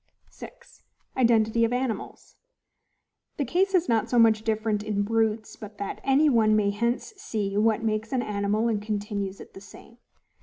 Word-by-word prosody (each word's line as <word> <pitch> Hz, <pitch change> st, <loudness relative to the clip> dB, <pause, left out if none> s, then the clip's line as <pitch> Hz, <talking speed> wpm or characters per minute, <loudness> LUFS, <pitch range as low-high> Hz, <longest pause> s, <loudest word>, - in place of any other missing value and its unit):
6. -, -, -14 dB, 0.3 s
Identity 230 Hz, -2 st, +3 dB
of 230 Hz, -, +1 dB
Animals. 250 Hz, -2 st, -4 dB, 1.0 s
The 285 Hz, -, -1 dB
case 380 Hz, +8 st, +1 dB
is 360 Hz, -1 st, +2 dB
not 225 Hz, -2 st, +1 dB
so 245 Hz, -, +1 dB
much 225 Hz, -2 st, +5 dB
different 220 Hz, -1 st, -1 dB
in 205 Hz, -1 st, -1 dB
BRUTES 220 Hz, 0 st, -1 dB
but 210 Hz, -1 st, -11 dB
that 200 Hz, -, -5 dB
any 275 Hz, +3 st, +3 dB
one 220 Hz, -5 st, +3 dB
may 205 Hz, -1 st, +2 dB
hence 235 Hz, -, -2 dB
see 215 Hz, -, -3 dB
what 220 Hz, +1 st, +2 dB
makes 215 Hz, 0 st, -2 dB
an 255 Hz, -2 st, 0 dB
animal 210 Hz, +2 st, -1 dB
and 215 Hz, -3 st, -1 dB
continues 205 Hz, -2 st, -4 dB
it -, -, -13 dB
the 195 Hz, -, -11 dB
same. 230 Hz, +3 st, -15 dB
220 Hz, 165 wpm, -26 LUFS, 210-235 Hz, 1.0 s, much